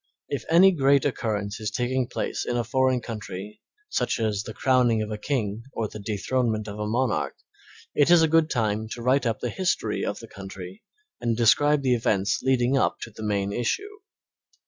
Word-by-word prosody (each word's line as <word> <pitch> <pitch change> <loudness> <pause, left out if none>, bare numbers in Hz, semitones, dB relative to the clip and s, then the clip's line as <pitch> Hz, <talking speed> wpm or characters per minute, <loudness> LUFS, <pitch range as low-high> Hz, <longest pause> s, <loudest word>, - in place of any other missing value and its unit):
If 135 -5 -3
any 180 +4 +7
great 140 -4 +3
occurrence 105 -6 -2
is 110 -1 -2
taking 125 +3 -1
place - - -3
in 120 - -2
a 120 - +1
foreign 130 +1 +1
country 105 -3 -7 0.3
such 420 - -1
as 105 -3 0
the 110 - -7
crowning 125 -4 +3
of 105 - -6
a 105 - -3
king 110 -4 -2
or 110 - -2
the 105 - -9
dethronement 110 +1 -1
of 105 0 -7
a 105 - -2
monarch, 120 +2 0 0.6
it 145 +1 +3
is 175 -2 +7
a - - +5
good 160 0 +3
time 110 -4 -1
to 120 - -7
write 130 +1 +2
up 115 - -2
the 120 - -2
history 185 -1 -1
of - - -2
the - - -10
country 95 0 -9 0.4
and 115 -1 -1
describe 140 +5 +4
the 130 -2 +3
events 105 -4 +1
leading 130 0 +2
up - - +1
to 115 - -6
the 110 - -11
main 100 -2 -1
issue. 405 - -2
120 Hz, 190 wpm, -25 LUFS, 105-130 Hz, 0.6 s, any